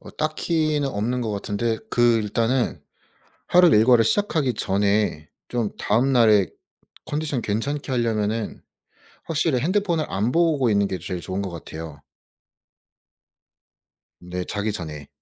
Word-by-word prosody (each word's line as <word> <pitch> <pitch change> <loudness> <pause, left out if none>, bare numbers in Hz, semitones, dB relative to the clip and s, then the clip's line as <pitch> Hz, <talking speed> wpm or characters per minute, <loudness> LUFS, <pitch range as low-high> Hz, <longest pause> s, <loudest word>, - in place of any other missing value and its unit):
어 - - -12
딱히는 155 -1 0
없는 120 +2 -2
것 115 -3 -2
같은데 105 +2 -2
그 120 -1 +4
일단은 115 +4 0 0.7
하루 180 0 +6
일과를 115 -2 +5
시작하기 155 - +1
전에 100 -5 0 0.2
좀 115 -4 -1
다음날에 115 - +3 0.6
컨디션 150 -4 -2
괜찮게 135 +7 -2
하려면은 110 -2 -1 0.6
확실히 155 -4 0
핸드폰을 175 -1 0
안 105 +6 -1
보고 160 -7 +2
있는 100 -1 +2
게 95 - -3
제일 90 +2 -5
좋은 95 +2 -4
것 95 - -4
같아요. 80 -3 -8 2.2
네. 90 +1 -5
자기 105 +2 -2
전에. 75 -6 -7
115 Hz, 260 characters per minute, -23 LUFS, 100-145 Hz, 2.2 s, 하루